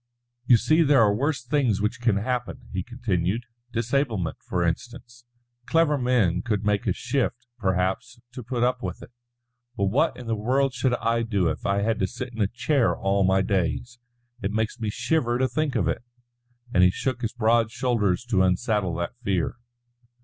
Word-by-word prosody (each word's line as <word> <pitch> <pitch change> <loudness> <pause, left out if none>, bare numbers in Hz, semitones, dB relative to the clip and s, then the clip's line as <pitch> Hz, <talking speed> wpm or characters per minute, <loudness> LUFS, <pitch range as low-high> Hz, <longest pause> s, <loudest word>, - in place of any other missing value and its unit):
"You 120 - +7
see 155 +8 +3
there 140 -6 +5
are 105 -1 +4
worse 135 +2 -1
things 125 -6 +1
which 110 +4 -2
can 115 -5 +2
happen," 125 +3 -3
he 95 - -1
continued; 105 -2 -2 0.3
"disablement, 115 - -1
for 90 -1 -1
instance. 120 - -4 0.4
Clever 165 -2 +3
men 120 -10 +2
could 105 -2 -2
make 105 -1 +1
a - - +3
shift, 125 -1 -2
perhaps, 95 +3 -1
to 125 - -7
put 120 0 -2
up 125 +1 +1
with 90 -2 -5
it. - - -13 0.7
But 100 -1 +1
what 155 +8 +2
in 125 - -9
the 115 -1 -1
world 130 +5 +1
should 125 0 +1
I 115 0 0
do 100 -7 +1
if - - -3
I 100 0 +1
had 110 0 0
to 95 - +1
sit 125 +2 -7
in 115 - -4
a 100 - +3
chair 125 +3 +1
all 100 0 +1
my 95 +1 +3
days? 100 +6 -1 0.4
It 100 - -1
makes 110 +3 -2
me 110 -2 -2
shiver 120 +2 0
to 130 +1 +2
think 145 +2 -1
of 95 -8 +1
it," 85 - -1 0.7
and 90 - +4
he 90 - +7
shook 125 +6 -2
his 115 0 -2
broad 115 -1 +2
shoulders 115 -5 0
to 95 -3 +4
unsaddle 95 0 +1
that 85 +7 -3
fear. 95 -4 -1
115 Hz, 185 wpm, -25 LUFS, 100-125 Hz, 0.7 s, You